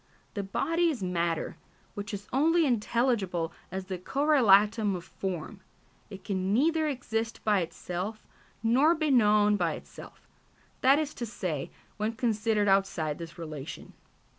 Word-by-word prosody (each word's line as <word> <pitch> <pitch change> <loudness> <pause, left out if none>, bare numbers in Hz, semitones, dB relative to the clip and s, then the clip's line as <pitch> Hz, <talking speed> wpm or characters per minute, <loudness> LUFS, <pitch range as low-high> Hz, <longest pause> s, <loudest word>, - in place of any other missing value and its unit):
The 200 - -2
body 330 - +1
is 260 -11 -3
matter 170 -3 -1 0.4
which 205 +2 -6
is 205 -1 -6
only 325 +5 +4
intelligible 220 - 0 0.2
as 190 0 -4
the 185 -1 -5
correlatum 220 - +4
of 175 - -6
form; 190 +1 -5 0.5
it 195 -2 -10
can 190 -2 -1
neither 315 +7 +2
exist 230 -5 -3
by 210 -2 +3
itself 180 +5 -5 0.4
nor 270 +9 +4
be 310 -2 0
known 210 -4 +4
by 170 -4 0
itself - - -12 0.5
that 270 +2 +6
is 305 -1 -2
to 240 - -5
say, 170 -10 -3 0.3
when 215 +2 -1
considered 220 -2 +1
outside 195 -6 +1
this 170 0 -8
relation. 155 -4 -7
210 Hz, 140 wpm, -29 LUFS, 185-250 Hz, 0.5 s, that